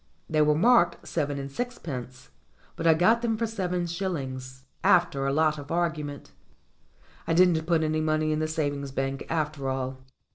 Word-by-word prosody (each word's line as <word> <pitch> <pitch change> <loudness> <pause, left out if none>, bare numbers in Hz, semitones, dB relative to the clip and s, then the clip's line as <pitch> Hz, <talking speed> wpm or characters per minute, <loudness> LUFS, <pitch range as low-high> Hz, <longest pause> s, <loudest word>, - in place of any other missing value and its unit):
They 155 -1 +2
were 150 0 +4
marked 225 +1 +3
seven 145 -3 -1
and 140 0 -5
sixpence, 130 - -6 0.4
but 165 - -1
I 160 - +6
got 220 +8 +4
them 225 -2 0
for 230 - 0
seven 180 -5 -2
shillings, 135 -8 -4 0.2
after 140 -6 +3
a - - +1
lot 155 +1 +2
of 145 0 -9
argument. 155 -4 -2 1.0
I 165 - +1
didn't 170 -3 +4
put 165 -2 +2
any 155 0 0
money 155 0 +1
in 155 - 0
the 155 - 0
savings 145 -3 -2
bank 135 +1 -2
after 150 -4 -2
all. 130 0 -3
155 Hz, 170 wpm, -27 LUFS, 140-175 Hz, 1.0 s, I